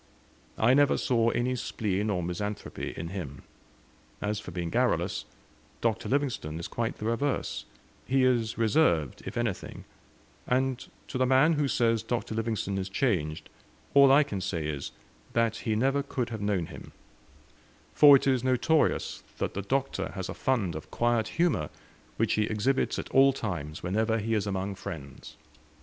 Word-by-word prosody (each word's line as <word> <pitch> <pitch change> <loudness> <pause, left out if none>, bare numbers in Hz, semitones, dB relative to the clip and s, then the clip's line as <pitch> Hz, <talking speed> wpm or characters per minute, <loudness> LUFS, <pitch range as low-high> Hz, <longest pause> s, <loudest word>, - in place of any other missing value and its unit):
I 115 +3 +4
never 145 0 +4
saw 115 -2 +2
any 125 +2 0
spleen 105 -3 -2
or 90 -4 0
misanthropy 105 +4 -4
in 85 - -4
him 80 -7 -6 0.8
as 105 0 -2
for 105 - -9
being 85 -1 -4
garrulous, - - 0 0.5
Dr. 115 -1 -1
Livingstone 130 - -1
is 85 - -5
quite 115 -1 -3
the 105 - -6
reverse: 125 +5 -1 0.4
he 135 0 +3
is 120 -4 +2
reserved, 110 - +2
if - - -5
anything; 115 -5 -3 0.6
and 130 0 0 0.2
to 130 - -4
the 130 - +3
man 135 +5 +5
who 145 -2 +1
says 115 -3 +2
Dr. 115 0 -3
Livingstone 110 -3 -2
is 95 0 -4
changed, 90 - -1 0.5
all 140 -1 +7
I 145 +2 +7
can 100 -8 -5
say 85 -4 -2
is, 75 -2 -4 0.4
that 115 -1 +1
he 110 -1 -1
never 135 +5 +2
could 130 -4 -3
have 110 -3 -5
known 100 -4 0
him, - - -11 1.0
for 145 -2 +9
it 135 - +2
is 130 -3 +2
notorious 130 +5 +1 0.2
that - - -2
the 100 - -3
Doctor 135 +7 -2
has 95 -2 -5
a - - -3
fund 110 -10 0
of 80 - -8
quiet 120 -2 +1
humour, 165 - 0 0.5
which - - +1
he 105 - +2
exhibits 110 +6 0
at - - -5
all 135 0 +6
times 85 - -5
whenever 110 +5 +1
he 115 +1 -1
is 105 -2 0
among 95 0 -2
friends. 80 -8 -8
115 Hz, 165 wpm, -28 LUFS, 95-130 Hz, 1.0 s, for